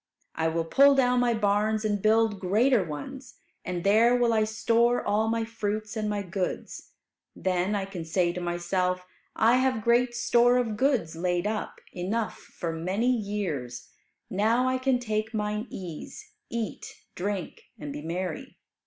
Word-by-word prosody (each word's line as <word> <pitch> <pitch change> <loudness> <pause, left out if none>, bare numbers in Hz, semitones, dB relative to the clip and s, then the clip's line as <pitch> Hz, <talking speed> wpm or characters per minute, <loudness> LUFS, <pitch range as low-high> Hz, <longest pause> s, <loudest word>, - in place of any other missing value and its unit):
I 160 0 0
will 165 0 -1
pull 275 +10 +6
down 250 -2 +3
my 240 -1 +2
barns 215 +1 +1
and 205 -2 0
build 220 -1 +3
greater 215 +5 +3
ones, 165 - -8 0.3
and 180 -1 -4
there 225 +5 +5
will 240 -1 +2
I 215 -1 +3
store 230 +2 +2
all 215 +2 +1
my 225 0 0
fruits 215 -1 -3
and 215 -1 -1
my 205 -1 -2
goods. 185 0 -4 0.4
Then 185 +2 0
I 195 -1 -1
can 190 -4 -6
say 175 +1 +1
to 180 - -5
myself, 180 +1 -1 0.3
'I 230 +3 +4
have 255 -4 +1
great 240 +1 +3
store 240 +1 +4
of 230 -4 0
goods 250 - +1
laid 175 +2 -1
up, 215 0 -3
enough 205 +5 -2
for 165 -1 -6
many 195 +10 0
years; 170 - -4 0.4
now 225 +6 +2
I 255 0 +1
can 260 -1 +2
take 220 -1 -2
mine 210 +2 -2
ease, 190 - -8 0.2
eat, 230 -3 -5 0.2
drink, 190 -1 -4
and 145 -2 -6
be 145 - -6
merry.'" 170 +1 -5
210 Hz, 160 wpm, -27 LUFS, 180-235 Hz, 0.4 s, pull